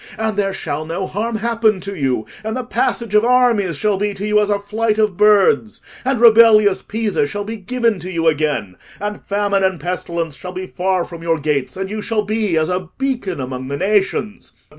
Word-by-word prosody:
And 220 -1 -1
there 195 -1 0
shall 155 -5 -4
no 165 +4 -3
harm 220 +5 -3
happen 225 -2 +1
to 200 +2 -5
you: 130 -8 -1 0.2
and 220 +3 -3
the 255 - -3
passage 235 -2 -1
of 210 +1 +5
armies 235 - +3
shall 210 +4 +1
be 205 +1 -1
to 195 +1 -5
you 210 0 +3
as 210 0 +1
a 205 - +2
flight 215 +2 -1
of 215 -3 +1
birds, 210 +2 +3 0.2
and 260 -2 0
rebellious 215 -4 +6
Pisa 215 -8 -1
shall 205 +7 -4
be 220 +2 -5
given 230 0 0
to 180 +2 -6
you 165 -2 0
again, 145 - 0 0.2
and 210 0 -4
famine 200 -1 0
and 190 -3 +1
pestilence 170 -1 -3
shall 180 +3 -8
be 185 +1 -5
far 185 -1 -1
from 170 -2 -10
your 165 -1 0
gates, 145 0 -2
and 190 0 -3
you 215 0 -3
shall 215 0 -1
be 210 -4 0
as 155 0 +2
a 180 -1 -3
beacon 250 - -2
among 130 0 -5
the 140 +1 -3
nations. 205 +2 -1
200 Hz, 205 wpm, -18 LUFS, 175-215 Hz, 0.2 s, rebellious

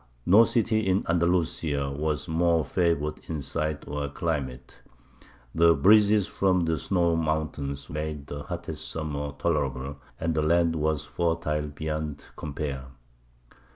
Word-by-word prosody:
No 105 +6 +7
city 110 -2 +1
in 95 +1 +2
Andalusia 85 -4 +1
was 75 0 -2
more 85 -1 +2
favoured 85 -4 0
in 75 -3 -3
site 75 +1 -3
or 70 0 -3
climate; 70 -5 -4 0.7
the 85 0 +5
breezes 105 +5 +5
from 95 -3 +1
the 80 -2 0
snow 85 0 +1
mountains 75 -3 -2
made 75 -1 -4
the 70 0 -6
hottest - - -5
summer 75 -2 -3
tolerable, 70 -4 -1 0.2
and 80 0 0
the 80 - +1
land 85 +1 +3
was 75 -1 0
fertile 80 -3 -1
beyond 75 0 -4
compare. 70 -3 -4
80 Hz, 125 wpm, -27 LUFS, 75-85 Hz, 0.7 s, No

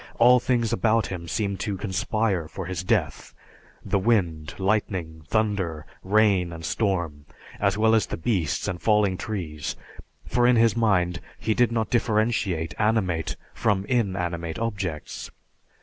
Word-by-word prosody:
All 125 +2 +7
things 120 -2 0
about 115 -1 +2
him 85 -2 -6
seemed 100 +1 -2
to 100 -1 -2
conspire 105 -2 -1
for 95 +3 -6
his 90 +1 -4
death: 90 - -1 0.5
the 100 - +1
wind, 85 -9 0
lightning, 95 -5 -1
thunder, 95 -8 -1 0.2
rain 100 -3 +3
and 80 0 -7
storm, 85 -10 -1 0.3
as 100 0 +1
well 110 +1 +4
as 110 -2 +3
the - - -4
beasts 85 - -1
and 85 -2 -3
falling 105 -3 +3
trees; 85 -8 -4 0.5
for 120 0 +2
in 125 - +5
his 115 -1 +4
mind 90 -7 +1 0.2
he 110 - 0
did 120 +1 +3
not 115 -2 -1
differentiate 110 -8 +1
animate 105 -7 +1 0.2
from 100 -3 0
inanimate 90 -8 -1
objects. 95 - -4
100 Hz, 140 wpm, -25 LUFS, 85-110 Hz, 0.5 s, All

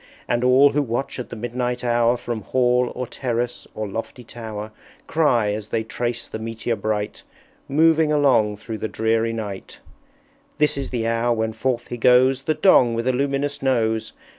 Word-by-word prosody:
And 120 0 0
all 130 +3 +6
who 145 - +1
watch 130 +1 -3
at 125 - -6
the - - -7
midnight 120 +2 -3
hour, 120 0 +2
From 120 -2 -4
Hall 125 +2 +1
or 125 - -3
Terrace 120 -1 -3
or 110 -1 -3
lofty 115 +4 -6
Tower, 110 -2 -7 0.3
Cry, 120 -10 +2
as 105 0 -5
they 110 0 -1
trace 120 +1 -3
the 110 - -6
Meteor 115 +1 -3
bright, 105 -1 -3 0.5
Moving 160 +1 +4
along 125 -8 +3
through 110 +1 -7
the - - -2
dreary 110 +1 0
night, 105 -4 -6 0.8
"This 150 -1 +2
is 140 -1 -4
the 120 -3 -2
hour 115 +1 +1
when 110 0 -1
forth 120 +1 -2
he 120 - -4
goes, 125 +2 +4
The 155 +3 0
Dong 125 -11 +5
with 115 +2 -2
a 130 - +3
luminous 140 +2 -1
Nose! 110 -4 0
120 Hz, 175 wpm, -22 LUFS, 110-130 Hz, 0.8 s, all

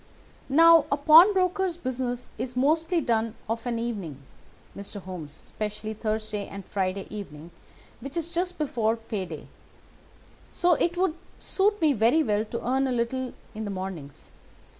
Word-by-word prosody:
"Now 330 +3 +7
a 285 - +2
pawnbroker's 365 +3 +5
business 250 -4 -3
is 250 +1 -4
mostly 325 +6 +2
done 230 -3 0
of 225 +2 -3
an 235 -1 -1
evening, 205 - -4 0.6
Mr. 200 +1 -6
Holmes, 180 -5 -7
especially 215 +6 -5
Thursday 215 -1 -3
and 200 -1 -9
Friday 190 0 -2
evening, 165 -5 -8 0.5
which 275 +4 -6
is 335 -1 0
just 355 +1 -1
before 230 -7 0
pay 220 -4 -4
day; 155 -2 -8 1.0
so 350 0 +3
it 345 +2 0
would 370 -3 +2 0.3
suit 415 +2 +1
me 305 -3 +4
very 240 +7 +3
well 210 -4 +1
to 230 +2 -5
earn 265 +2 +2
a - - -1
little 250 +2 -1 0.2
in 220 0 -5
the 205 - -4
mornings. 185 -7 -7
235 Hz, 150 wpm, -26 LUFS, 210-315 Hz, 1.0 s, Now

